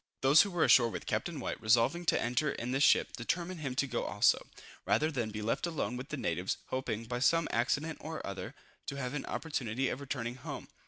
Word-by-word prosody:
Those 135 +3 +7
who 200 - +1
were 175 -3 +1
ashore 120 -2 +6
with - - -6
Captain - - -2
White, - - -4
resolving 115 +11 +3
to - - +4
enter 125 +5 +1
in 120 +2 -4
this 135 +2 0
ship, 145 - +4
determined 170 +8 -2
him 135 -4 -3
to 140 - +2
go 120 -3 -2
also, 105 - +2 0.4
rather 155 +1 +2
than 120 -6 -2
be 105 0 -5
left 115 +10 0
alone 160 -7 -2
with 125 +2 -7
the 150 - -3
natives, 90 -6 -1
hoping, 125 -4 -2
by 120 +1 -3
some 165 +5 +3
accident 145 +7 0
or 160 +1 -6
other, 100 -1 -6 0.3
to - - -3
have 130 -1 -3
an 145 - -4
opportunity 130 -5 -2
of 130 - -4
returning 120 -3 -4
home. - - -7
130 Hz, 215 wpm, -32 LUFS, 115-155 Hz, 0.4 s, Those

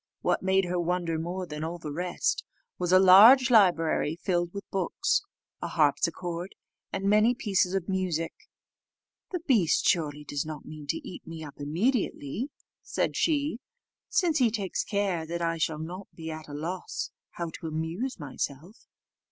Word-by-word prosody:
What - - +1
made 190 0 +2
her 180 0 -1
wonder 170 -1 -1
more 180 +3 -3
than 150 -2 -6
all 165 +2 -3
the 155 -3 -6
rest, 175 +3 -1 0.4
was 180 -1 0
a 185 - +8
large 220 +8 +8
library 170 -7 +4
filled 175 0 -1
with 200 +1 -7
books, 190 -3 +1 0.4
a - - -2
harpsichord, 170 +4 0 0.4
and 195 - -3
many 215 +4 +4
pieces 195 -6 +1
of 190 -3 -1
music. 185 -4 -1 1.0
"The 360 -3 -3
beast 230 - +3
surely 150 -5 +1
does 145 -1 -3
not 155 -2 -7
mean 155 -2 -9
to - - -3
eat - - -9
me 165 -1 -7
up 145 -2 -10
immediately," 195 - -1 0.3
said - - -1
she, 295 -6 +1 0.5
"since 335 -5 +2
he 245 -3 +5
takes 205 -4 -2
care 200 -5 -1 0.2
I 165 -1 0
shall 155 0 0
not 175 +5 -7
be 160 -1 -6
at 155 0 -8
a 145 - -9
loss 170 +5 -4 0.2
how 170 -1 -4
to 165 - -5
amuse 165 +12 -3
myself." 145 - -6
175 Hz, 160 wpm, -28 LUFS, 160-200 Hz, 1.0 s, a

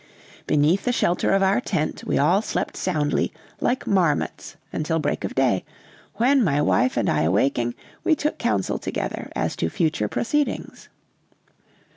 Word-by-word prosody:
Beneath 150 +6 +2
the 245 - +2
shelter 180 -7 +1
of 195 0 +3
our 195 +6 +3
tent, 170 -10 -2
we - - 0
all 170 +8 +3
slept - - -3
soundly, 150 -5 0 0.3
like 255 +1 0
marmots, 175 -7 0 0.2
until 160 +1 -1
break 150 -2 -1
of - - -4
day; 125 -8 +2 0.5
when, 255 +5 +3
my 145 -7 +2
wife 130 -4 +2
and 115 - +1
I 75 - +2
awaking, 120 - +1 0.3
we 315 - +3
took 300 0 -2
counsel 100 -3 0
together - - -4
as - - -1
to 80 - 0
future 155 - 0
proceedings. 290 - -2
155 Hz, 150 wpm, -23 LUFS, 130-200 Hz, 0.5 s, of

